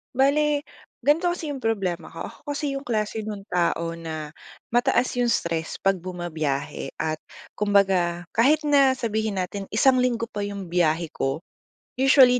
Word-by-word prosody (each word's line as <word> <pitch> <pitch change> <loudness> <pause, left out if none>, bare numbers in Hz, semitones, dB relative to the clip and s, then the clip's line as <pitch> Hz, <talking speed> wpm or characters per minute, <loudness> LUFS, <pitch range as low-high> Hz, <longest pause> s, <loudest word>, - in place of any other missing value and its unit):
Bale, 290 +2 +3 0.4
ganito 310 +5 +3
kasi 340 -4 -2
'yung 270 - -5
problema 195 -7 -1
ko, - - -7
ako - - -18 0.2
kasi 295 +1 -2
'yung 275 +1 -5
klase 220 -1 -1
nun 205 -2 -5
tao 170 -1 +1
na 160 -2 -5 0.4
mataas 240 +1 +3
'yung 245 - +3
stress 165 -7 -1
'pag 195 -1 +3
bumabiyahe 160 -7 -3
at 155 -1 -2 0.4
kumbaga, 190 -4 +3
kahit 295 +7 +4
na 280 -3 +5
sabihin 220 -3 -1
natin 195 +1 -3
isang 255 +4 +4
linggo 245 -2 +1
pa 210 - -5
'yung 200 -4 -6
biyahe 170 -2 +2
ko, 135 +5 -2 0.6
usually, 260 -2 +7
205 Hz, 150 wpm, -25 LUFS, 175-260 Hz, 0.6 s, usually